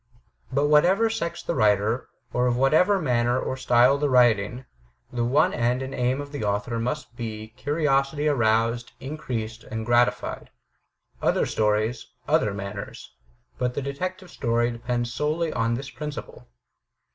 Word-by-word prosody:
But 140 +2 +1
of 145 - +2
whatever 190 +9 +4
sex 170 -6 -3
the - - -2
writer, 105 0 +2 0.2
or 125 0 +2
of 120 -1 +1
whatever 160 +10 +4
manner 125 -4 +1
or - - -2
style 125 +1 +4
the 145 -1 0
setting, 120 0 +3 0.5
the 120 -1 0
one 150 +9 +3
end 125 +2 0
and 135 0 -6
aim 125 +2 0
of 145 0 -6
the 145 -5 -4
author 105 +3 -1
must 125 +1 -3
be 110 -2 -6
curiosity 145 +3 0
aroused, 115 -3 +1
increased 115 -6 -5
and 110 0 -5
gratified. 120 +1 +1 0.7
Other - - +2
stories, 110 +2 0 0.2
other 105 - +2
manners; 100 0 -7 0.5
but 125 -1 -1
the - - -1
Detective 185 +7 -5
Story 120 -1 0
depends 120 0 -3
solely 155 +4 -1
on 115 +1 0
this 135 +3 -6
principle. 150 -1 -7
125 Hz, 145 wpm, -25 LUFS, 115-145 Hz, 0.7 s, whatever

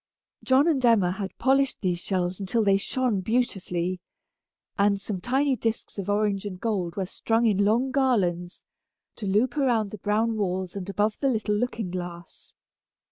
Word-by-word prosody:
John 270 +4 +4
and 285 -6 +1
Emma 220 -7 +4
had 190 0 -5
polished 270 0 +2
these 180 -4 0
shells 180 0 -2
until 205 +4 0
they 195 -1 +4
shone 240 0 -1
beautifully, 185 -5 -1 0.8
and 200 -1 +2
some 195 -2 -4
tiny 270 +5 +1
disks 225 -2 -3
of 195 +1 -4
orange 205 -1 +1
and 190 -3 -6
gold 190 -7 -2
were 195 - -1
strung 225 +5 0
in 205 -3 +3
long 235 +6 +2
garlands, 190 -10 0 0.5
to 210 - -5
loop 215 +7 +1
around 235 -7 +1
the 215 - -8
brown 220 +3 0
walls 185 -2 -2
and 195 -1 -5
above 210 +2 0
the 275 - +2
little 215 -4 0
looking 220 -3 -2
glass. 175 -2 -8
205 Hz, 165 wpm, -26 LUFS, 185-235 Hz, 0.8 s, John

